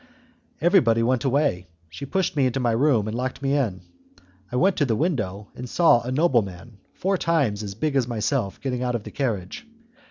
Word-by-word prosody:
Everybody 150 - +4
went 130 +3 +1
away, 135 - +1 0.2
she 85 +12 -8
pushed 190 +1 -1
me 135 -3 +3
into 125 +1 -2
my 120 -2 +1
room 115 -3 +2
and 110 - -3
locked 130 +2 -4
me 140 +1 +1
in. 110 -10 -1 0.7
I - - -4
went 190 +9 +3
to 145 - +2
the 115 - +1
window, 105 - -2
and 125 0 -8
saw 165 -7 +4
a 125 +2 -5
nobleman 115 - 0 0.2
four 190 0 0
times 140 -12 +1
as 100 -2 -6
big 150 +6 -1
as 130 -3 +2
myself 115 -2 -2
getting 125 -3 -2
out 125 -1 -1
of 115 - -3
the - - -9
carriage. 115 - -3
125 Hz, 195 wpm, -24 LUFS, 110-145 Hz, 0.7 s, Everybody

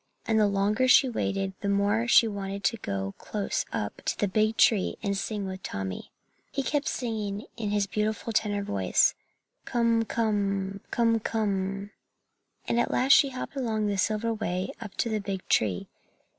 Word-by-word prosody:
And 220 -1 +2
the 210 - +5
longer 205 +5 +1
she 260 +1 +7
waited 195 -5 -2
the 200 - -1
more 205 +4 +2
she 235 - +6
wanted 200 -1 -5
to 230 +6 +1
go 100 - -3
close 205 -2 -2
up - - -4
to - - -1
the 205 - +1
big 215 +3 +1
tree 205 -5 +4
and 200 -2 0
sing 200 +1 -3
with 190 0 -6
Tommy. 95 - -5 0.4
He 275 - -1
kept 290 +1 -1
singing 215 -4 -3
in 220 -3 -3
his 205 -1 +1
beautiful 215 +3 -2
tenor 205 -2 0
voice, 95 - +2 0.5
"Kum 230 -1 +2
kum, 200 -3 -1
kum 230 -1 +2
kum!" 200 -2 -2 0.8
and 235 - +1
at - - +1
last 260 +2 +2
she 280 -1 +7
hopped 255 +2 -6
along 225 -5 -1
the 205 -1 0
silver 220 +3 +1
way 185 -4 -2
up 210 -3 -8
to - - 0
the 215 -1 0
big 195 -2 -5
tree. 95 -5 +1
210 Hz, 170 wpm, -27 LUFS, 195-225 Hz, 0.8 s, she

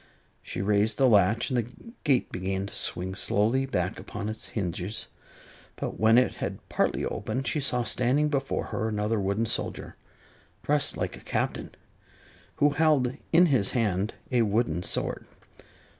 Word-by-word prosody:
She 90 - -4
raised 105 +2 +2
the 135 - +5
latch 110 +2 +3
and 125 - +1
the 120 -1 -1 0.3
gate 135 -6 +2
began 95 +1 -2
to 100 - -8
swing 95 +2 -1
slowly 115 +7 +1
back 90 -7 -1
upon 105 0 -5
its 110 0 -5
hinges; 95 0 -4 0.7
but - - -5
when 110 +2 +5
it 125 - +4
had - - -2
partly - - 0
opened, 135 +1 -3
she 120 +6 0
saw 125 -3 +1
standing 125 +6 +2
before 140 -2 -1
her 110 -2 -1
another 105 +1 0
wooden 100 +3 0
soldier, - - -3 0.7
dressed 145 -1 +1
like - - -2
a - - -11
Captain, - - -2 0.8
who 145 0 +3
held 145 -4 +2 0.2
in 170 +2 +7
his 130 - +2
hand 105 -2 0 0.2
a 125 -2 +3
wooden 105 -6 +1
sword. - - -2
110 Hz, 155 wpm, -27 LUFS, 100-130 Hz, 0.8 s, in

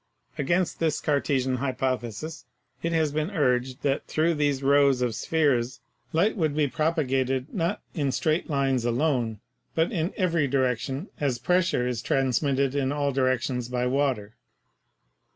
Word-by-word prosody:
Against 175 +5 0
this 160 -2 +1
Cartesian 135 -3 0
hypothesis 130 +1 -3 0.4
it 170 - -1
has 160 -3 +1
been 155 +3 -1
urged 130 -6 0
that 140 -1 0
through 165 +2 +2
these 145 -3 0
rows 140 -2 +4
of 120 -2 0
spheres 130 -1 +1 0.3
light 185 +7 +2
would 155 -7 0
be 150 -1 +2
propagated, 135 -3 0
not 180 +1 -1
in 145 -5 0
straight 155 +6 0
lines 135 -4 +1
alone, 120 -3 0 0.3
but 165 +1 +2
in 170 +2 -1
every 170 -6 +2
direction, 130 - -1
as 135 -4 0
pressure 175 -1 +1
is 120 -3 -2
transmitted 135 +1 +1
in 140 -1 0
all 145 -1 0
directions 130 -2 0
by 125 0 -1
water. 125 -5 0
140 Hz, 140 wpm, -26 LUFS, 125-155 Hz, 0.4 s, rows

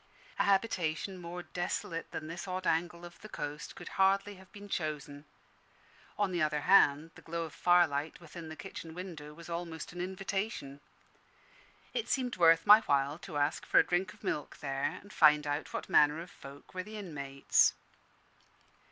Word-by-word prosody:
A - - +3
habitation 190 -3 0
more 175 +1 -6
desolate 175 -2 -3
than 155 - -6
this 170 +4 -6
odd 185 0 -3
angle 170 +1 0
of 175 - -13
the 215 - -10
coast 145 -4 -6
could - - -10
hardly 195 +1 +3
have 190 0 -17
been 205 0 -11
chosen; 150 -5 -4 0.9
on 205 -2 +1
the 175 -2 -1
other 150 -1 +1
hand, 160 -3 +5
the - - -14
glow 170 +1 -3
of 160 - -7
firelight 160 -4 +2
within 170 -1 -9
the 155 - -7
kitchen 165 -1 -8
window 170 -5 -7
was 170 0 -11
almost 170 -2 -5
an 175 - -5
invitation. 190 -5 -3 1.1
It 460 - -2
seemed 250 -2 0
worth 165 -1 +5
my 210 +1 +10
while 140 -3 +1
to 165 -6 -6
ask 145 +3 0
for - - +1
a - - +7
drink 180 +2 0
of - - -18
milk 150 - -3
there, 140 +4 -2
and 200 +1 -15
find 150 -2 +6
out 145 +1 -2
what - - -4
manner 150 +1 +4
of 175 +3 -8
folk 140 -5 -13
were 185 - -3
the 215 +3 -9
inmates. 140 -8 +1
170 Hz, 175 wpm, -32 LUFS, 150-185 Hz, 1.1 s, my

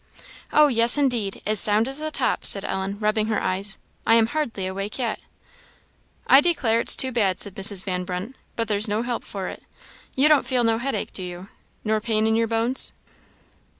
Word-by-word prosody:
"Oh, 300 0 +5
yes, 235 -1 +5
indeed; 240 -8 -1
as 215 0 +4
sound 215 +2 +3
as 270 +3 -2
a 310 - -3
top," - - -2
said 200 0 +2
Ellen, 190 +1 -4
rubbing 215 0 -1
her 220 - -1
eyes; 195 +2 0 0.3
"I 225 - +3
am 230 -1 +4
hardly 235 -7 -4
awake 195 +2 -5
yet." 235 -4 -3 1.1
"I 270 - +6
declare 265 -9 0
it's - - +4
too 260 - +3
bad," 205 -6 -1
said 200 - -3
Mrs. 195 -1 +2
Van 180 -2 -4
Brunt 180 +7 -6 0.2
"but 230 -1 -3
there's 210 +1 +2
no 215 +2 -2
help 240 -1 -4
for 195 -2 -7
it. - - -9 0.5
You 275 +3 +3
don't 300 -5 +3
feel 255 -2 0
no 225 -1 0
headache, 270 +3 -4
do - - -6
you, 180 +2 -9 0.3
nor 215 0 -1
pain 220 -1 -1
in 220 0 +1
your 230 0 0
bones?" 230 +3 +3
220 Hz, 195 wpm, -22 LUFS, 200-245 Hz, 1.1 s, I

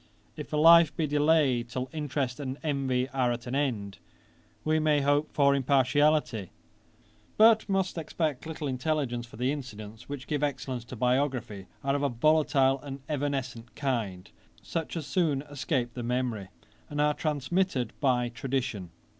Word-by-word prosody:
If - - -8
a 150 - 0
life 165 0 +7
be 160 - +1
delayed 145 -5 +2
till 130 +1 -3
interest 145 -4 -2
and 135 -1 -4
envy 135 -4 0
are 130 -3 +1
at 120 0 -4
an 125 - -5
end, 110 -8 -2 0.6
we 155 0 +2
may 155 -2 +3
hope 145 +2 +2
for 140 -1 +4
impartiality, 140 - +2 0.9
but 220 -1 +6
must 190 -3 0
expect 155 -2 -2
little 155 -2 -4
intelligence; 130 -3 -1
for 115 - -13
the 125 +3 +1
incidents 110 -5 -8
which 140 -1 -6
give 150 -1 -2
excellence 130 -4 -2
to 125 - -8
biography 125 -5 -1 0.2
are 135 0 +1
of 145 - -1
a 140 - +1
volatile 135 +1 +3
and 140 -1 -7
evanescent 135 -5 -3
kind, 110 -10 -3 0.3
such 165 +1 -4
as 160 - -4
soon 150 -5 0
escape 140 -4 -2
the 125 - -5
memory, 120 -4 -2 0.4
and 145 - -4
are 150 0 +3
transmitted 150 -2 -1
by 125 -3 +2
tradition. 120 -6 -3
135 Hz, 155 wpm, -28 LUFS, 125-150 Hz, 0.9 s, life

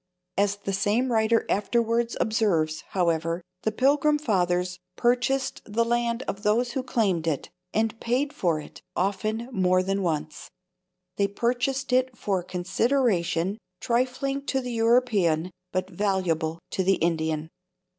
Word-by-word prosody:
'" 180 0 -54
As 200 0 -2
the 200 -1 -4
same 215 +6 +1
writer 225 0 +3
afterwards 230 +3 +1
observes, 175 -9 +1
however, 170 -1 0 0.2
the 220 - 0
Pilgrim 285 +5 +3
Fathers 180 - 0 0.2
"purchased 250 +2 +1
the 230 +2 0
land 235 +1 0
of 200 - -4
those 230 +4 +2
who 265 - -1
claimed 200 -10 0
it, 150 -4 -2 0.2
and 220 +1 0
paid 265 +5 0
for 170 -4 0
it—often, 215 +9 -3
more 185 -3 +2
than 195 +1 -1
once. 155 -4 -3 0.7
They 200 - +3
purchased 250 +5 -1
it 255 -1 +2
for 195 -2 0
a - - -7
consideration, 190 -1 0 0.2
trifling 260 +3 0
to 265 - +1
the 250 -2 -4
European, 220 -8 +2 0.2
but 185 0 -1
valuable 175 -5 0
to 190 - 0
the 195 +1 +4
Indian. 160 -2 -1
210 Hz, 135 wpm, -26 LUFS, 180-240 Hz, 0.7 s, the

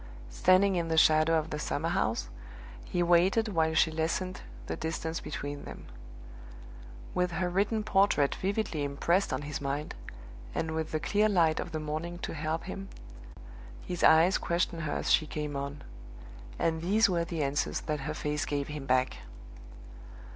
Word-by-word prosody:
Standing 185 - +4
in 170 -1 -1
the 160 0 0
shadow 155 +1 +5
of 160 0 -3
the 150 - -3
summer 155 +2 -2
house, 145 - 0 0.6
he 175 - 0
waited 180 +6 +3
while 160 -4 +1
she 160 0 +4
lessened 165 +4 -2 0.2
the - - -3
distance 160 0 -3
between 145 -1 -5
them. - - -9 1.3
With 180 -1 0
her 180 +2 0
written 205 +4 +1
portrait 195 -9 +3
vividly 195 -6 -2
impressed 170 +7 +1
on 130 +2 -2
his 150 +1 -5
mind, 140 +2 -3 0.6
and 160 - -1
with 160 0 -3
the 155 - 0
clear 210 +6 +2
light 165 -5 +3
of - - -4
the 155 - -3
morning 155 +3 -4
to - - -3
help 155 +1 -2
him, 195 +1 -7 1.0
his 180 -1 -4
eyes 165 +4 +6
questioned 170 -1 -1
her 155 -2 -2
as - - -1
she 155 - +4
came 150 -1 -4
on; 140 +1 -5 0.7
and 160 -1 0
these 210 +6 +4
were 175 -3 +1
the 165 -2 -2
answers 140 +1 -1
that 150 -1 -2
her 150 +3 -4
face 150 -1 -2
gave 145 0 -2
him 150 -2 -6
back. 130 0 +2
160 Hz, 165 wpm, -30 LUFS, 150-180 Hz, 1.3 s, eyes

